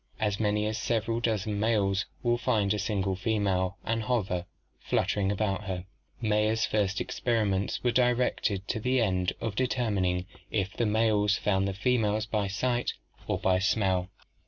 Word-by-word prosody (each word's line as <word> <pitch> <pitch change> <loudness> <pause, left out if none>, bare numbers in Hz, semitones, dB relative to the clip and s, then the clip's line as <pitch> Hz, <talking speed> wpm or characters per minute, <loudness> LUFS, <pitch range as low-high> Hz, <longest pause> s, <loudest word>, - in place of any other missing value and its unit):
As 105 -2 0
many 105 -1 +1
as 110 0 -2
several 115 +2 0
dozen 110 -3 -1
males 100 -3 +1 0.2
will 120 -1 +2
find 105 -6 +2
a 105 - -2
single 100 -2 0
female 95 -2 0
and 115 +1 0
hover, 100 -7 -1 0.3
fluttering, 100 -1 0
about 100 -1 -1
her. 90 -1 -4 0.3
Mayer's 110 0 +2
first 105 -1 0
experiments 105 -5 0
were 120 - +3
directed 120 -5 +1
to 110 - -1
the 125 +3 +1
end 95 -5 +1
of 110 -3 -3
determining 100 -8 0 0.2
if 100 -2 -1
the 120 - +1
males 105 -1 +3
found 95 -1 +1
the 100 - -2
females 110 -1 +1
by 105 -2 -1
sight 120 +5 0 0.3
or - - 0
by 95 -1 +2
smell. 95 -3 +1
105 Hz, 155 wpm, -29 LUFS, 95-115 Hz, 0.3 s, were